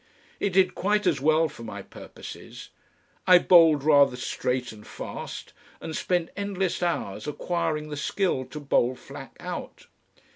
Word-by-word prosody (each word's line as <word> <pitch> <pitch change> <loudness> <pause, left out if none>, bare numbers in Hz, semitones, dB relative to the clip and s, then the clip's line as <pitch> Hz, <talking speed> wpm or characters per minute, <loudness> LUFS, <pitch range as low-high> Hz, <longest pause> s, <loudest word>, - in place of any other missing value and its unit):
It 200 - +1
did 185 -1 +4
quite 210 +3 0
as 155 -7 +2
well 155 +2 +4
for 150 -5 -12
my 100 -3 -7
purposes. - - -11 0.6
I 180 -1 +9
bowled 165 -5 +6
rather 145 -3 +5
straight 125 0 -2
and 105 -1 -13
fast, - - -7 0.3
and 160 - -6
spent 175 -2 -1
endless 195 -2 -2
hours 170 - -2
acquiring 155 0 -2
the 150 - -4
skill 150 -3 0
to 150 - -8
bowl 130 -3 +1
Flack - - -11
out. - - -7
155 Hz, 145 wpm, -26 LUFS, 135-180 Hz, 0.6 s, I